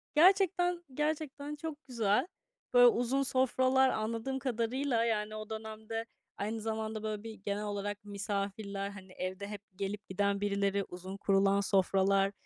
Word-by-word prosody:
Gerçekten, 355 0 +4
gerçekten 300 0 -2
çok 305 0 -6
güzel. 225 - +2 0.5
Böyle 245 0 +9
uzun 245 +3 +2
sofralar 260 0 +3
anladığım 230 +4 -2
kadarıyla, 245 0 0
yani, 215 -2 0
o 215 0 -6
dönemde 220 +1 -5 0.3
aynı 220 +2 -2
zamanda 220 0 -3
böyle 215 -1 -3
bir 225 -1 -6
genel 205 0 -3
olarak 205 +1 -3
misafirler, 200 0 -3
hani, 190 -2 -11
evde 185 +2 -4
hep 205 -1 -6
gelip 200 +1 -4
giden 200 +1 +1
birileri, 200 -1 +1
uzun 185 +2 -8
kurulan 195 0 +3
sofralar, 195 0 +3
215 Hz, 135 wpm, -32 LUFS, 200-255 Hz, 0.5 s, Böyle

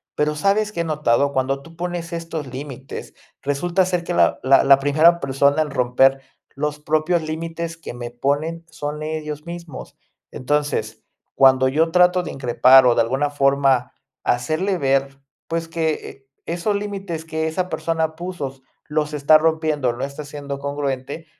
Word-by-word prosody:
Pero, 150 0 0
¿sabes 200 +6 +1
que 170 -5 -2
he - - 0
notado? 140 -3 +1
Cuando 135 +1 0
tú 165 +3 -15
pones 175 0 -4
estos 165 -4 -5
límites, 135 0 -8 0.3
resulta 175 +7 0
ser 180 -2 -1
que 175 - -3
la - - +3
la 135 +1 +5
la 135 0 +6
primera 155 +5 +4
persona 140 +2 +2
en 150 - -2
romper 135 +1 +3 0.3
los 150 +1 -3
propios 155 +3 +1
límites 165 +1 -5
que 165 - -8
me 120 -1 -7
ponen, 150 +7 -2
son 150 -1 -5
ellos 150 -1 -5
mismos. 170 -1 -9 0.3
Entonces, 145 +3 -2 0.3
cuando 130 -1 +5
yo 160 +4 +1
trato 180 0 +4
de - - -6
increpar, 130 0 +5
o 120 - +5
de - - +4
alguna 135 +5 0
forma 135 -2 +2 0.3
hacerle 155 +11 0
ver, 135 -2 0 0.3
pues, 165 0 -2
que, 160 -1 0 0.2
eh, 135 - -16 0.2
esos 175 +5 -1
límites 195 -5 -4
que 160 0 -2
esa 180 +3 -2
persona 160 -2 -1
puso 155 -6 -6 0.3
los 150 0 -1
está 150 +1 +5
rompiendo, 155 -5 0
no 120 - -6
está 140 +2 -6
siendo 145 -1 -6
congruente, 140 +1 -4
150 Hz, 160 wpm, -21 LUFS, 135-165 Hz, 0.3 s, la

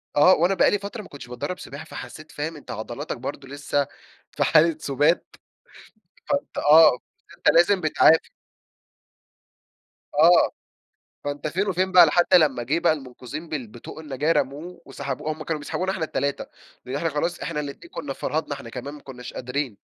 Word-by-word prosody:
آه، 150 +6 +7
وأنا 175 +4 +3
بقى - - +4
لي 205 - +1
فترة 205 +3 -6
ما 205 - -12
كُنتش 140 -4 -10
باتدرب 155 +10 -5
سباحة، 150 0 -9
فحسيت 155 0 -10
فاهم 155 +3 -4
أنت 150 - -10
عضلاتك 110 +3 -5
برضه 135 +2 -6
لسه 145 0 -1 0.4
في - - 0
حالة 165 +1 +4
سُبات، 145 +5 +1 0.9
فأنت 285 0 -2
آه، 150 -3 +7 0.4
أنت - - +1
لازم 185 +3 +5
بتعافر. 160 0 +4 1.8
آه، 165 +4 +5 0.7
فأنت 145 +1 -3
فين 190 +6 -1
وفين 185 0 0
بقى، 180 -2 +9
لحد 175 +4 +2
لّما 145 -8 +5
جيه 150 +7 0
بقى 170 -2 +3
المُنقذين 140 +2 -8
بال 135 -7 -4
بطوق 115 +7 -11
النجاة 150 0 -1
رموه 165 +4 -2
وسحبوا، 135 +2 -4
هم 155 - -9
كانوا 155 0 -3
بيسحبونا 185 +5 -2
إحنا 190 -4 -3
التلاتة؛ 140 -2 -2 0.4
لأن 130 +1 -5
إحنا 165 +3 0
خلاص 165 +4 -2
إحنا 165 -3 -3
الاتنين 145 - -7
كنا 145 -3 -5
فرهدنا 155 +1 -2
إحنا 115 - -10
كمان، 130 +4 -7
ما 150 - -11
كُناش 125 -2 -10
قادرين. 125 -3 -3
150 Hz, 165 wpm, -24 LUFS, 140-170 Hz, 1.8 s, بقى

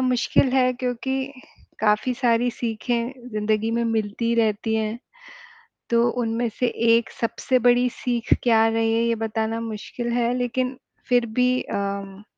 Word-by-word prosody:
मुश्किल 255 +1 +2
है 255 -1 +3
क्योंकि, 260 +2 -3 0.5
काफ़ी 215 +4 +2
सारी 240 0 +2
सीखें 240 +2 -3
ज़िंदगी 215 +1 0
में 235 - +1
मिलती 225 +1 -1
रहती 220 -1 +1
हैं, 220 +1 -1 0.9
तो 235 0 +4
उनमें 230 +1 -1
से 250 - +2 0.3
1 230 - -1
सबसे 255 +2 +1
बड़ी 245 +1 +5
सीख 240 -1 -3
क्या 225 -2 +4
रही 225 0 +1
है, 230 - +2
ये 235 0 +2
बताना 225 0 -2
मुश्किल 230 +2 -5
है 240 0 +1
लेकिन 250 +1 -1 0.3
फिर 245 -1 +3
भी 250 0 +3
अम, 200 0 -4
235 Hz, 140 wpm, -23 LUFS, 220-245 Hz, 0.9 s, बड़ी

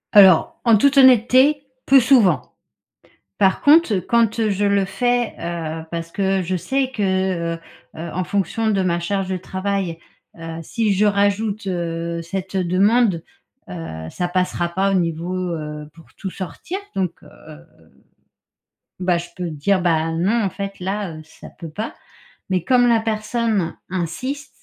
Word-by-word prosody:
Alors 190 -5 +6
en 230 -3 +5
toute 280 +6 +3
honnêteté, 260 +3 +5 0.2
plus 270 0 +7
souvent. 230 - +3 0.8
Par 190 -1 +2
contre 300 -6 +5
quand 225 +3 +1
je 200 +1 -1
le 200 -1 +2
fais, 245 +3 0
heu, 165 -2 -4
parce 165 0 -4
que 195 0 0
je 185 +1 -2
sais 265 +8 -1
que, 190 -4 0
heu, - - -12 0.4
heu, 165 +1 -5
en 185 +1 -1
fonction 200 +5 -1
de 195 -3 +1
ma 175 -2 0
charge 195 +2 -2
de 185 - -2
travail. 190 -2 -3 0.4
Heu, 165 0 -6
si 215 +3 0
je 205 +2 +2
rajoute, 205 +1 +1
heu, 170 -1 -3
cette 190 +3 -5
demande, 190 +1 +2 0.5
heu, 80 - -7
ça 175 -1 -3
passera 180 -1 0
pas 190 +3 0
au - - 0
niveau, 170 0 -1
heu, 150 -4 -4
pour 165 - -17
tout 190 - -5
sortir 190 - -6 0.2
donc, 185 -3 0
heu, - - -14 1.4
bah, 180 -1 +1
je 175 0 -6
peux 180 -2 -4
dire: 180 +6 0
«Bah, 165 -2 +1
non 200 +8 +1
en 195 - 0
fait 195 -1 -6
là, 190 -2 -3
heu, - - -9
ça 160 - -14
peut 165 -3 -8
pas» 215 +8 -5 0.6
mais 185 -3 0
comme 250 -2 +4
la 230 -1 +4
personne 220 -3 -1 0.2
insiste 190 - -4
190 Hz, 155 wpm, -21 LUFS, 170-215 Hz, 1.4 s, plus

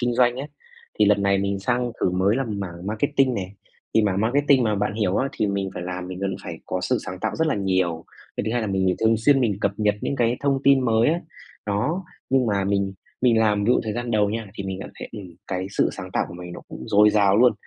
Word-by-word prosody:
kinh 120 -1 0
doanh 120 0 +3
ấy. 140 +3 -5 0.5
Thì 105 - +6
lần 105 -1 +3
này 100 0 +3
mình 100 0 -1
sang 120 +3 -1
thử - - +2
mới 95 +5 +2
làm 110 -7 -2
mảng 90 -1 -6
marketing 135 +4 +1
nè. 95 -3 -3 0.5
Thì 110 - +5
mảng 100 -1 +1
marketing 135 +3 +3
mà 105 -1 +1
bạn 105 +1 -1
hiểu 105 -3 0
á 135 +4 +1
thì 105 - 0
mình 100 -1 -2
phải - - -5
làm, 90 0 -5
mình 90 0 -6
vẫn 95 -1 -1
phải 80 - -6
có 90 0 -2
sự 90 - 0
sáng 90 0 -5
tạo - - -2
rất 160 0 +1
là 155 - +1
nhiều. 95 -4 0 0.3
Cái - - -1
thứ 110 - -1
hai 120 - +1
là 110 - -2
mình 95 -2 +1
thường 110 0 +4
xuyên 135 +5 +4
mình 105 -5 +1
cập 100 - +1
nhật 105 -1 +2
những 140 - -2
cái 120 -1 +2
thông 140 -1 +1
tin 135 -1 +6
mới 115 +2 +3
á, 170 +2 +1 0.5
đó. 145 - -1 0.3
Nhưng 130 -2 +3
mà 100 -2 +1
mình 100 -1 0 0.3
mình 120 -3 +4
làm 105 -2 +2
ví - - 0
dụ 125 - +4
thời 110 - -2
gian 120 +1 -3
đầu 105 -2 +2
nha 115 -1 -3
thì 100 - -5
mình 95 -1 -4
cảm - - -7
thấy, - - -7
ừm, 95 -6 -9
cái 95 0 -3
sự - - +2
sáng 95 0 -8
tạo - - 0
của 85 - -9
mình 90 0 -8
nó - - -8
cũng - - -9
dồi 105 0 +6
dào 100 -1 +4
luôn. 125 0 +6
105 Hz, 270 wpm, -23 LUFS, 95-120 Hz, 0.5 s, Thì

